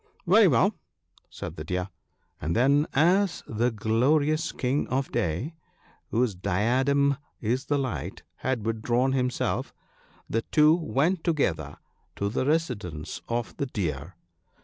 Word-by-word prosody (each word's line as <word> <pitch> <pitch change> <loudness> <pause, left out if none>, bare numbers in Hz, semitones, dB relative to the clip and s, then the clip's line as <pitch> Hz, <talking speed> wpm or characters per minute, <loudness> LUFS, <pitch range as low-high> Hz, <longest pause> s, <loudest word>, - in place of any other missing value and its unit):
" - - -34
Very - - +7
well," - - +3 0.6
said - - -7
the 75 - -5
Deer; 90 +3 -2 0.5
and 80 +2 -1
then, 140 +5 +4
as 180 +6 +3
the 115 +3 0
glorious 140 +9 +1
King 130 +3 -1
of 130 +1 -1
Day, 85 - -1 0.6
whose 120 -1 +1
diadem 130 +10 +1 0.2
is 125 +5 -1
the 145 - +1
light, 130 -4 -4
had 125 -4 -2
withdrawn 120 +3 +1
himself, 125 -2 -1 0.5
the 115 - 0
two 150 +5 +4
went 165 +1 0
together 85 - 0 0.4
to 100 - -1
the 130 +5 -1
residence 110 - -2
of 120 -1 -2
the 140 - -1
Deer. 85 - -4
125 Hz, 130 wpm, -27 LUFS, 105-145 Hz, 0.6 s, Very